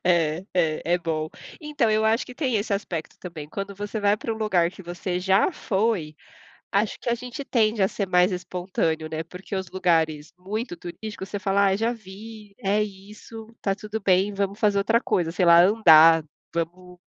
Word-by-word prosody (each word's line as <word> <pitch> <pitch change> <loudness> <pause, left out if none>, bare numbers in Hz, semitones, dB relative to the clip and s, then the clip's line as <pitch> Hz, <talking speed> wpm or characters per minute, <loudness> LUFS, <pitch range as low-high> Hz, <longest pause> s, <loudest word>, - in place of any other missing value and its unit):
É, 170 -1 +2
é, 160 -3 +1
é 180 - +1
bom. 155 -2 -2 0.3
Então 295 -7 0
eu 215 0 +2
acho 225 +3 +2
que 250 - -11
tem 260 -5 -1
esse 205 +1 -2
aspecto 175 -5 -4
também. 160 -5 -8
Quando 200 +3 -5
você 205 +2 -5
vai 205 0 +2
pra 225 - -4
um 220 - -5
lugar 185 -6 +1
que 190 - -13
você 175 +1 -4
já 190 - +3
foi, 195 - -1 0.6
acho 205 +2 0
que 240 - -3
a 235 - +2
gente 250 +3 -7
tende 220 -5 +1
a 190 - +5
ser 200 - -3
mais 180 +1 +3
espontâneo, 180 -3 -2
né? 160 +1 -3
Porque 180 +4 -8
os 190 -2 -4
lugares 160 -5 0
muito 200 +1 -5
turísticos, 190 +3 -7
você 205 - -4
fala 200 0 +2
"Ah, 190 - +2
já 225 +4 0
vi, 210 -1 -11
é 205 +2 +2
isso, 210 +2 -8
tá 195 -1 0
tudo 215 +1 -5
bem, 195 +1 +2
vamos 200 +1 -2
fazer 205 -2 +2
outra 225 +4 +2
coisa, 170 -8 0
sei 180 +1 +1
lá 170 0 +8
andar, 165 -6 +7 0.3
vamos 180 +2 -5
195 Hz, 195 wpm, -24 LUFS, 175-215 Hz, 0.6 s, lá